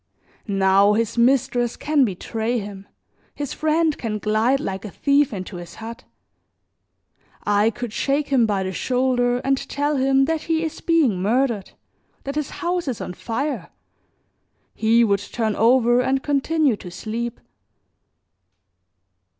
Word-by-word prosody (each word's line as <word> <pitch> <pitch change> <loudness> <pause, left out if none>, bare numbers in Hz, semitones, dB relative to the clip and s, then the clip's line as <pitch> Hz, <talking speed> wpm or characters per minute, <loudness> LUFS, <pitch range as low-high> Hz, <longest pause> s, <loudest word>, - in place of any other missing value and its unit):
Now 195 0 +4
his 225 0 0
mistress 240 -1 +2
can 295 -3 +2
betray 220 +4 -2
him, 200 -2 -7 0.5
his 290 -2 -4
friend 315 0 +1
can 220 -3 -3
glide 220 +6 +1
like 195 -7 -4
a 215 - -6
thief 285 +7 +2
into 185 -2 -6
his 175 -1 -10
hut; 230 +3 -9 1.4
I 205 +1 +3
could 235 0 -6
shake 285 +4 0
him 250 -5 +3
by 200 -2 0
the 190 - -3
shoulder 245 +2 +1
and 270 0 +3
tell 290 +1 0
him 270 +1 +3
that 320 +1 -1
he 325 0 0
is 320 - -5
being 295 - +2
murdered, 230 -1 0 0.5
that 275 - -4
his 300 -1 -2 0.2
house 350 -2 -1
is 250 -4 -2
on - - -5
fire; 270 +10 -3 1.0
he 230 +2 +3
would 200 -3 +2
turn 220 +1 -2
over 240 +1 +4
and 265 +1 0
continue 290 -2 +1
to 180 - -9
sleep. 225 +6 -5
240 Hz, 140 wpm, -22 LUFS, 210-275 Hz, 1.4 s, Now